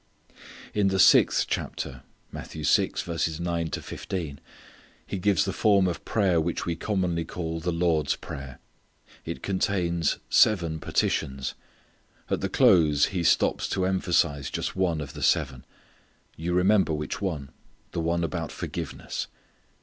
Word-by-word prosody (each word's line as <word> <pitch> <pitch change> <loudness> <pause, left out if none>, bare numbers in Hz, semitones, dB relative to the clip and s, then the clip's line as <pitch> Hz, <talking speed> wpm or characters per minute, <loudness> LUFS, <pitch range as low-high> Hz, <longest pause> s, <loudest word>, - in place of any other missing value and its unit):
In 105 -2 +2
the 95 0 +1
sixth - - +6
chapter - - -4 0.3
He - - -5 2.8
gives 100 +1 +2
the 95 - -2
form 100 -4 +3
of 90 - -4
prayer 95 -6 +2
which 85 +1 -2
we 85 - -1
commonly 90 -3 -1
call 80 0 -4
the 90 +2 -2
Lord's 85 -3 +1
prayer. 70 -2 -8 0.7
It 65 - -6
contains 90 -4 0
seven 85 -7 +3
petitions. 65 -3 -1 0.8
At - - 0
the - - -1
close 75 -4 +5
He 90 - 0
stops 85 - +2
to 95 -1 0
emphasize 85 -7 +1
just - - -3
one 90 -4 0
of 70 - -7
the - - -8
seven. 65 -1 +1 0.7
You 85 +2 -3
remember 95 -1 +3
which 75 +4 -4
one; 80 -8 -3 0.4
the 85 - -2
one 85 +1 0
about 85 -1 -3
forgiveness. - - -5
85 Hz, 125 wpm, -26 LUFS, 80-95 Hz, 2.8 s, sixth